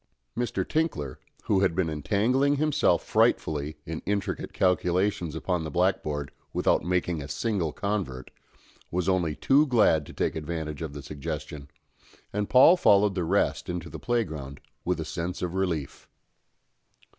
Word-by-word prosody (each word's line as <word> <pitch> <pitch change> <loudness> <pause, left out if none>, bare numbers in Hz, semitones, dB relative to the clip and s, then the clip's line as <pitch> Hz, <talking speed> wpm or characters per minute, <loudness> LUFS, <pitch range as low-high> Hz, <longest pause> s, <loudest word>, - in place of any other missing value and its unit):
Mr. 115 -5 -2
Tinkler, 110 - -1 0.2
who 100 - +2
had 95 -4 +2
been 95 -2 +1
entangling 110 - +1
himself 150 0 +2
frightfully 75 0 +1
in 80 0 -5
intricate 100 -1 -2
calculations 90 -2 +1
upon 90 0 -1
the 80 - -4
blackboard, 75 -4 0 0.2
without - - +2
making 90 -2 0
a 70 - -6
single 95 -4 -1
convert, 95 -12 -3 0.6
was 90 +1 -1
only 90 -5 +1
too 145 - +4
glad 105 - +3
to - - -10
take - - -1
advantage 80 -1 -4
of 80 -3 -4
the 70 -1 -8
suggestion, 75 0 -6 0.6
and 105 0 -1
Paul 135 +8 +7
followed 100 - +4
the 90 -2 -1
rest 80 - 0
into 85 -2 -4
the - - -7
playground 80 - -2 0.2
with 90 -1 -1
a 80 - -3
sense 85 +4 -4
of 90 -1 -2
relief. 85 -7 -2
90 Hz, 145 wpm, -27 LUFS, 75-100 Hz, 0.6 s, Paul